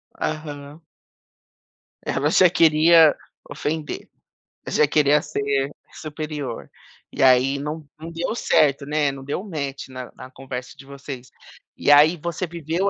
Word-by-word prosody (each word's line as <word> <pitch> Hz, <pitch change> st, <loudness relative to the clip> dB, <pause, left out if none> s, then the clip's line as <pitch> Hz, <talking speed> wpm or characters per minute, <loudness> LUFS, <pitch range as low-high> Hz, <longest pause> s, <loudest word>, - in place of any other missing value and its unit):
Aham. 150 Hz, 0 st, -6 dB, 1.2 s
Ela 145 Hz, -, 0 dB
já 180 Hz, +2 st, +5 dB
queria 160 Hz, -1 st, +5 dB, 0.3 s
ofender, 155 Hz, 0 st, -4 dB, 0.6 s
já 150 Hz, -, +3 dB
queria 150 Hz, 0 st, +3 dB
ser 140 Hz, -2 st, -1 dB, 0.2 s
superior. 150 Hz, -5 st, -6 dB, 0.4 s
E -, -, -5 dB
aí, 130 Hz, +1 st, +4 dB
não 150 Hz, +1 st, -6 dB
não 165 Hz, +1 st, -8 dB
deu 165 Hz, +5 st, -3 dB
certo, 145 Hz, -, +2 dB
né, 150 Hz, -1 st, 0 dB
não 135 Hz, -1 st, -9 dB
deu 145 Hz, +7 st, -4 dB
match 140 Hz, -9 st, -5 dB
na 130 Hz, -1 st, -8 dB
na 130 Hz, 0 st, -11 dB
conversa 130 Hz, -1 st, -8 dB
de 135 Hz, -, -15 dB
vocês. 135 Hz, -2 st, -9 dB, 0.5 s
E -, -, +2 dB
aí, 150 Hz, +4 st, +6 dB
você 170 Hz, +3 st, -4 dB
viveu, 170 Hz, +3 st, -2 dB
150 Hz, 130 wpm, -22 LUFS, 140-160 Hz, 1.2 s, aí